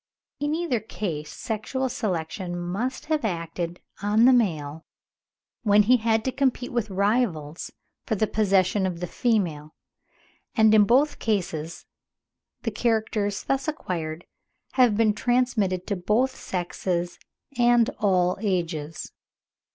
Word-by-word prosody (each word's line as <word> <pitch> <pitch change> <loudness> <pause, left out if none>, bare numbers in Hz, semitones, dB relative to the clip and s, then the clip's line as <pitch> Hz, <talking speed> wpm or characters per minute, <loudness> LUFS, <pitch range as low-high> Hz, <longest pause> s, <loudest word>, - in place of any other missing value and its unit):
In 295 +2 0
either 325 -8 0
case 160 -8 -5
sexual 230 - -3
selection 180 -5 -3
must 195 +9 -3
have 310 -2 0
acted 170 -3 -3 0.2
on 210 +3 +4
the 260 - +7
male 160 -10 0 0.8
when 210 -2 +5
he 250 +4 +5
had 225 -1 +1
to 260 - +1
compete 260 -2 0
with 235 -4 -1
rivals 195 -6 0 0.4
for 220 - +1
the 215 - +2
possession 195 -2 +2
of 175 -2 -4
the 180 - -2
female; 170 -8 -1 0.8
and 220 -1 +5
in 210 -1 +7
both 275 +7 +3
cases 170 -7 -2 0.8
the 225 - -1
characters 215 -2 0
thus 270 +2 -1
acquired 170 - -4 0.5
have 245 -5 +4
been 220 -2 +4
transmitted 215 -6 +1
to 200 - -1
both 220 +8 +1
sexes 175 -1 -3 0.4
and 240 -1 +4
all 185 -3 +2
ages. 165 -6 -2
205 Hz, 125 wpm, -25 LUFS, 175-240 Hz, 0.8 s, the